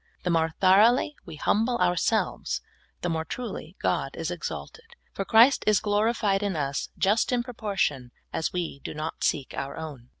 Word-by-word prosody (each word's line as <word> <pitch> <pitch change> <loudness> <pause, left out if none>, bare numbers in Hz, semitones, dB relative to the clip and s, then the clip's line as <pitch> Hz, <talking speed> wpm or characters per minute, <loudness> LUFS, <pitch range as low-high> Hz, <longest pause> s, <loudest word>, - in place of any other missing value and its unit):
The 180 - 0
more 165 -1 +1
thoroughly 215 +10 +5
we 165 - -7
humble 225 +10 +1
ourselves, 180 +4 0 0.4
the 175 - -1
more 160 -1 -1
truly 245 +8 -6
God - - -1
is - - -3
exalted, 460 +1 -7 0.2
for, 195 - -3
Christ 235 +7 +6
is 215 -2 +5
glorified 210 -1 +1
in 200 -3 -1
us 140 -2 -2
just 210 +6 +2
in 245 -1 +1
proportion 195 - -2 0.2
as 160 - -1
we 175 -6 -3
do - - -6
not 155 +1 -4
seek 140 -3 0
our 140 - -4
own. 145 -7 -8
195 Hz, 165 wpm, -27 LUFS, 160-225 Hz, 0.4 s, Christ